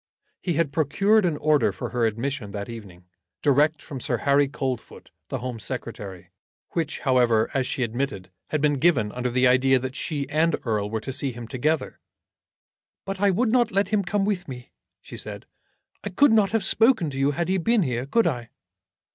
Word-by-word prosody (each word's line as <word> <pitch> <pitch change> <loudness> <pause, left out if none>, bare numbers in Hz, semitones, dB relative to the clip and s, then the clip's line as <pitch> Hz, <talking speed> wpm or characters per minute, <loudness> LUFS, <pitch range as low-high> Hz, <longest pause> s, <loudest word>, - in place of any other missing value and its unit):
He 175 - -1
had 160 -2 0
procured 195 +8 +3
an 165 -4 0
order 155 -1 +2
for 120 - -6
her 120 -2 +1
admission 115 -1 -4
that 100 -1 -4
evening, 100 -6 -10 0.4
direct 150 +2 +3
from 135 - -7
Sir - - -1
Harry 140 0 +3
Coldfoot, 135 -4 -5 0.2
the - - -3
Home 125 -1 -5
Secretary, 105 -4 -7 0.4
which, 165 -2 -2
however, 120 -5 +3
as 130 -2 0
she 130 - -1
admitted, 115 -6 -3 0.2
had 155 - -1
been 145 -2 +2
given 130 -10 +3
under 125 +2 -2
the 125 +2 +2
idea 130 +1 +4
that 130 +1 -4
she 145 -1 -3
and 160 +2 +2
Erle 105 -3 -1
were 110 0 -3
to 135 - -4
see 135 +1 0
him 120 -1 -8
together. 140 +3 -1 1.1
"But 195 0 -5
I 205 - +4
would 220 +5 +1
not 240 -2 +3
let 195 +2 +1
him 210 -2 +1
come 195 +2 0
with 190 -3 -2
me," 125 -2 -9 0.3
she - - -10
said. - - -7 0.6
"I 205 - -3
could 230 +8 +4
not 215 -3 +4
have 220 -2 0
spoken 220 - +3
to 135 - -5
you, 135 +1 +3
had 165 +4 -1
he 190 +1 +1
been 225 +3 +2
here; 125 -2 -2
could 230 +9 +2
I?" 120 -7 -2
140 Hz, 195 wpm, -24 LUFS, 120-175 Hz, 1.1 s, idea